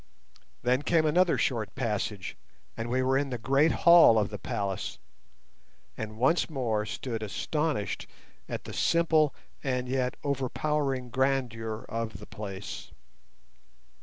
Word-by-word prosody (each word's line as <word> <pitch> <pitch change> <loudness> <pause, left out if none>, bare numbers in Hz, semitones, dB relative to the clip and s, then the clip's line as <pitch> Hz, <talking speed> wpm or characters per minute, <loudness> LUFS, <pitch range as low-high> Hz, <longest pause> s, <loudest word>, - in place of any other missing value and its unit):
Then 125 +2 +2
came 160 +1 +2
another 175 +3 +3
short 115 -6 -1
passage, 105 -5 -2 0.4
and 115 +1 -4
we 130 +2 +1
were 135 +1 +3
in 140 -1 -2
the 125 - -3
great 135 +7 +3
hall 170 -9 +9
of 105 -1 +1
the 105 - -5
palace, 100 - -3 1.0
and 110 0 -6
once 135 +11 +2
more 115 -8 -1
stood 115 -1 -4
astonished 145 +3 -2 0.4
at - - -4
the - - -8
simple 160 -3 +3 0.3
and 125 -2 -1
yet 130 0 -1
overpowering 135 -1 -1
grandeur 120 -4 -1
of 115 -1 -3
the - - -11
place. 100 -2 -7
125 Hz, 130 wpm, -29 LUFS, 110-140 Hz, 1.0 s, hall